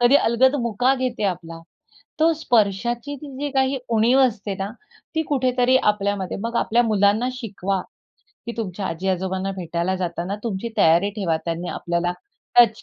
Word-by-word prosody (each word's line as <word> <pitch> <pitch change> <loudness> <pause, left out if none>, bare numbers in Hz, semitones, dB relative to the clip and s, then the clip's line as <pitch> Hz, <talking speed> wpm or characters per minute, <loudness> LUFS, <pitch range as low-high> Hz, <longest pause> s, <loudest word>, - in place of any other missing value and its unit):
कधी 245 +3 +5
अलगद 260 +2 +3
मुका 245 +4 +2
घेते 255 -4 -2
आपला. 165 -3 -3 0.6
तो 325 +1 +4
स्पर्शाची 240 +1 0
जी 285 0 -5
काही 265 0 +2 0.2
उणीव 240 +5 +4
असते 210 -5 +1
ना, 195 +1 -3 0.4
ती 320 - +1
कुठेतरी 255 -2 +3 0.2
आपल्यामध्ये 200 -2 -2
मग 235 +1 -2
आपल्या 240 +2 +3
मुलांना 215 +2 +2
शिकवा, 195 -6 -3 0.7
की 235 - -3
तुमच्या 195 -3 -3
आजी 185 +4 -3
आजोबांना 190 +1 -1
भेटायला 175 +1 -2
जाताना 180 +2 -3
तुमची 225 +1 -2
तयारी 170 +5 +4
ठेवा. 170 -6 0
त्यांनी 170 +1 -3
आपल्याला 175 0 -1 0.5
टच 225 -2 +6
210 Hz, 145 wpm, -22 LUFS, 185-245 Hz, 0.7 s, टच